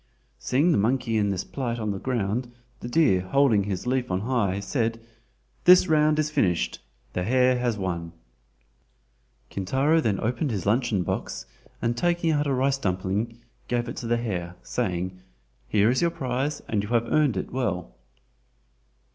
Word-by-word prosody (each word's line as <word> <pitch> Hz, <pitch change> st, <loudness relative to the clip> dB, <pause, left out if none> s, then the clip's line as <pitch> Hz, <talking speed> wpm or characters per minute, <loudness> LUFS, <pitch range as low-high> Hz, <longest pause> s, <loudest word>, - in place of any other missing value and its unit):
Seeing 140 Hz, -, +2 dB
the 155 Hz, -, +3 dB
monkey 115 Hz, +1 st, +1 dB
in 105 Hz, -2 st, +2 dB
this 95 Hz, -2 st, -1 dB
plight 120 Hz, -4 st, -3 dB
on 110 Hz, -2 st, -2 dB
the 100 Hz, -, -4 dB
ground, 120 Hz, 0 st, -2 dB, 0.3 s
the 120 Hz, -, -6 dB
deer 120 Hz, -, +3 dB
holding 105 Hz, +1 st, +3 dB
his 100 Hz, -1 st, -3 dB
leaf 125 Hz, 0 st, 0 dB
on 90 Hz, 0 st, 0 dB
high 105 Hz, -5 st, 0 dB
said: 115 Hz, +2 st, -1 dB, 0.7 s
"This 180 Hz, +1 st, +8 dB
round 155 Hz, -1 st, +3 dB
is 155 Hz, 0 st, 0 dB
finished—the 60 Hz, -, -2 dB
hare 125 Hz, +3 st, +3 dB
has 120 Hz, -3 st, 0 dB
won." 85 Hz, -4 st, -3 dB, 1.4 s
Kintaro 135 Hz, -, +2 dB
then 105 Hz, -8 st, 0 dB
opened 125 Hz, +6 st, -1 dB
his 100 Hz, -7 st, -3 dB
luncheon 110 Hz, -2 st, +1 dB
box 65 Hz, -, -4 dB, 0.4 s
and 115 Hz, 0 st, +1 dB
taking 175 Hz, +3 st, +1 dB
out 150 Hz, -1 st, +1 dB
a 140 Hz, -, +1 dB
rice 135 Hz, +1 st, +1 dB
dumpling, 100 Hz, +2 st, -2 dB, 0.3 s
gave 120 Hz, 0 st, -1 dB
it 120 Hz, -, -5 dB
to 120 Hz, -, -5 dB
the 120 Hz, 0 st, +2 dB
hare 90 Hz, -7 st, -3 dB
saying: 90 Hz, +9 st, -2 dB, 0.5 s
"Here 105 Hz, -, +3 dB
is 130 Hz, -, +1 dB
your 170 Hz, -, +3 dB
prize, 135 Hz, 0 st, -2 dB
and 105 Hz, -2 st, 0 dB
you 105 Hz, -, -6 dB
have 115 Hz, -1 st, +2 dB
earned, 145 Hz, 0 st, +2 dB
it -, -, -4 dB
well!" 90 Hz, -, -2 dB
115 Hz, 165 wpm, -26 LUFS, 95-130 Hz, 1.4 s, This